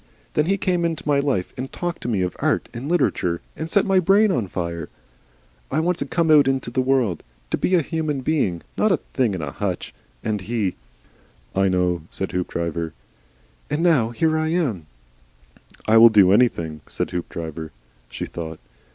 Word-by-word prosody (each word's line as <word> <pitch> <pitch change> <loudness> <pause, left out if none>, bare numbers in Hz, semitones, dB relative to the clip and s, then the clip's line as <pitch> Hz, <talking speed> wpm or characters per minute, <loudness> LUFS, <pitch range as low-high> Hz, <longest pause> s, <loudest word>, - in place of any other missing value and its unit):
Then 150 +1 +2
he 195 +1 +2
came 180 -2 0
into 165 -2 -2
my 145 -1 +3
life, 135 -11 -1
and 130 +1 -5
talked 175 0 -4
to - - -5
me 105 -6 +1
of 90 - -3
art - - 0
and 125 +5 -5
literature, 90 - +1 0.2
and 160 +1 -5
set 200 - +3
my 190 -1 +4
brain 200 +4 +4
on 115 - 0
fire. 85 -3 -4 0.8
I 150 - 0
wanted 175 +2 0
to - - -1
come 165 -2 +3
out 145 -3 +7
into 135 -3 0
the 130 - +1
world, 125 - +1 0.3
to - - +1
be 185 - +2
a 170 - +3
human 155 -3 -2
being 125 - 0
not 215 - +2
a 180 - +4
thing 120 -9 -1
in 85 - -4
a 70 - -4
hutch. 95 +2 -3 0.3
And 105 -2 -1
he 105 -2 -1 0.4
" - - -31
"I - - +4
know," 90 -2 +1
said 95 - -3
Hoopdriver. 85 -2 -2 0.8
"And 150 +3 0
now 150 -10 +4
here 155 +7 +1
I 155 - 0
am 140 - -1 0.5
" - - -28
"I 110 +1 +6
will 115 +1 +10
do 100 -4 +6
anything," 85 -9 +2
said - - -3
Hoopdriver. 80 -2 -5 0.4
She - - -5
thought. 80 -2 -7
120 Hz, 190 wpm, -22 LUFS, -, 0.8 s, will